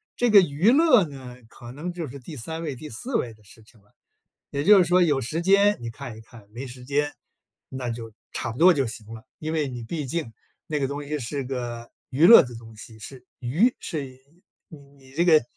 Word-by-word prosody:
这 245 -2 +1
个 205 -2 +9
娱 175 +6 +2
乐 265 - +5
呢， 130 -3 -10
可 120 0 -12
能 160 +7 -6
就 170 -3 -5
是 140 +2 -9
第 145 +4 -10
3 160 +7 -5
位 150 -4 -4
第 150 +4 -9
4 240 - -5
位 115 - -1
的 110 - -24
事 110 +2 -17
情 110 +1 -22
了， 100 +1 -31 0.6
也 140 0 -2
就 205 +5 +7
是 180 - +5
说 180 +2 +3
有 150 -6 +3
时 135 +7 -3
间 200 +3 +4
你 115 - -5
看 120 -1 -9
一 - - -11
看， 110 -2 -16
没 120 +5 -7
时 125 -1 -10
间， 145 +2 0 0.6
那 130 -2 -5
就 115 -1 -6 0.2
差 115 - -4
不 - - -11
多 180 +4 +7
就 135 -5 0
行 110 -1 -7
了。 110 +1 -11
因 155 0 -4
为 155 -3 0
你 125 -2 -7
毕 150 +5 -4
竟 135 -3 -3 0.4
那 150 -1 -1
个 135 - 0
东 145 +1 -5
西 150 +1 -4
是 140 +2 -4
个 120 -2 -5 0.2
娱 140 +5 +3
乐 230 +5 +10
的 125 -3 -7
东 115 -1 -12
西， 110 +1 -11
是 125 +3 -11
娱 160 - +2
是 155 -6 -4 0.6
你 155 - -12 0.2
你 130 -1 -19
这 170 +5 +1
个 160 -5 +6
140 Hz, 240 characters per minute, -25 LUFS, 120-165 Hz, 0.6 s, 乐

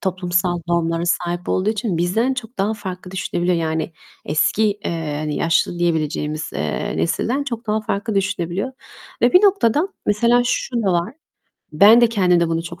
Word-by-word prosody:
toplumsal 180 -1 -1
normlara 165 -1 0
sahip 175 +1 -1
olduğu 190 +3 +1
için 215 -4 -2
bizden 220 +10 +1
çok 245 -2 -8
daha 205 +3 0
farklı 185 -3 -7
düşünebiliyor. 180 -1 -1
Yani, 160 0 -2 0.3
eski, 155 +8 +1 0.2
eee, 160 -3 -3
hani, 150 -1 -3
yaşlı 165 +1 +1
diyebileceğimiz, 155 -2 -1
eee, 75 -1 -3
nesilden 235 - -1
çok 235 -4 -5
daha 215 0 0
farklı 210 +1 -3
düşünebiliyor. 190 +4 -2 0.5
Ve 240 - +4
bir 365 - +6
noktada, 360 - +3 0.2
mesela 235 +4 +3
şu 245 0 -1
da 195 -3 +1
var; 175 +7 -1 0.6
-ben 205 +9 +7
de 240 - +6
kendimde 180 -6 +2
bunu 165 0 -1
çok 170 +1 -9
180 Hz, 160 wpm, -20 LUFS, 170-220 Hz, 0.6 s, ben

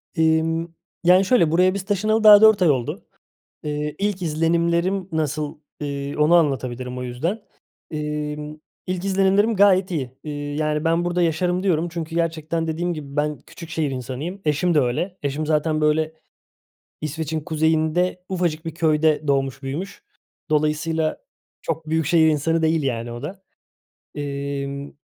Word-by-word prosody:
İmm, 160 0 +2 0.4
yani, 180 +2 +5
şöyle, 185 -8 +3
buraya 185 +3 +4
biz 200 -1 -4
taşınalı 215 +2 +1
daha 210 -1 +9
4 220 -3 +6
ay 170 - +5
oldu. 125 -4 -1 0.6
İii, 150 0 -3
ilk 200 -2 -1
izlenimlerim 170 +4 +1
nasıl, 150 -1 -2 0.2
iii, 140 0 -4
onu 155 +3 +4
anlatabilirim 130 -5 0
o - - -4
yüzden. 160 - -3 0.5
İmm, 150 0 -4 0.3
ilk 185 0 -3
izlenimlerim 195 +3 +2
gayet 190 -1 +4
iyi. 140 -8 -2
İii, 145 -1 -5
yani, 150 0 0
“Ben 165 +1 +2
burada 175 0 0
yaşarım.” 175 +3 +1
diyorum 175 -3 +1
çünkü 165 -1 -6
gerçekten 165 -1 -1
dediğim 170 +2 -2
gibi 140 -2 -8
ben 150 0 0
küçük 165 - -12
şehir 155 -3 -1
insanıyım. 135 - -5
Eşim 155 +3 +1
de 150 - +5
öyle. 135 +10 -1
Eşim 145 +2 -2
zaten, 155 0 +1
böyle, 155 +1 +1 0.9
İsveç'in 155 +1 -3
kuzeyinde 160 +3 0
ufacık 175 -4 -1
bir 160 - -4
köyde 155 -2 +2
doğmuş 135 -1 0
büyümüş. 155 +9 -5 0.5
Dolayısıyla 155 +1 0 0.4
çok 160 -1 -4
büyük 160 -1 0
şehir 160 -1 +4
insanı 160 +2 +1
değil 160 -1 +2
yani 120 -3 -2
o 120 +2 -8
da. 190 +6 -7 0.8
İmm, 140 0 -4
160 Hz, 145 wpm, -22 LUFS, 150-175 Hz, 0.9 s, daha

